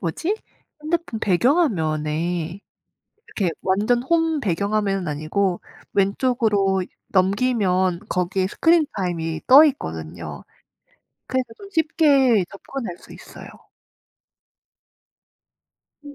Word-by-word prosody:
뭐지? 320 - -2 0.4
핸드폰 315 -6 -2
배경화면에 175 - 0 0.7
이렇게 190 -5 -1
완전 215 +6 +1
홈 325 +1 +1
배경 200 0 -1
화면은 195 -5 0
아니고 175 +5 -1 0.3
왼쪽으로 200 -2 +1 0.3
넘기면 190 -3 +1
거기에 180 +1 0
스크린 325 - +3
타임이 165 -4 -3
떠 275 +4 +9
있거든요. 80 - -5 0.8
그래서 260 -1 -1
좀 400 0 -12
쉽게 285 - +3
접근할 200 -2 -7
수 - - -15
있어요. - - -12 2.6
음 290 0 -10
200 Hz, 220 characters per minute, -22 LUFS, 175-260 Hz, 2.6 s, 떠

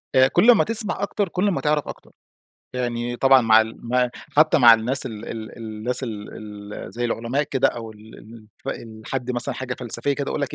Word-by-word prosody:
آآ، 130 0 +6
كل 185 - +3
أمّا 225 - +4
تسْمع 215 -2 0
أكتر، 200 -1 -1
كل 185 +4 0
أمّا 195 - 0
تعرف 150 -1 0
أكتر. - - -10 0.6
يعني 120 -1 -2
طبعًا 135 +1 +5
مع 110 -2 +6
ال 110 0 -4
م 125 +1 +2 0.3
حتى 155 +1 +5
مع 120 -4 +9
الناس 125 +5 +1
ال 115 - -6 0.2
ال 110 -1 -6
ال - - -15
الناس 115 +3 -3
ال 105 -4 -6 0.5
ال - - -8
زَي 120 +1 -3
العلماء 120 +4 -1
كده 135 -2 +1
أو 115 -2 -7
ال 110 +1 -15
الف 110 -1 -9
الحد 120 +3 -6
مثلًا 120 -1 0
حاجة 125 -1 -4
فلسفية 125 +3 -3
كده، 140 0 -3
يقول - - -2
لك: 140 - -3
125 Hz, 205 wpm, -22 LUFS, 115-140 Hz, 0.6 s, مع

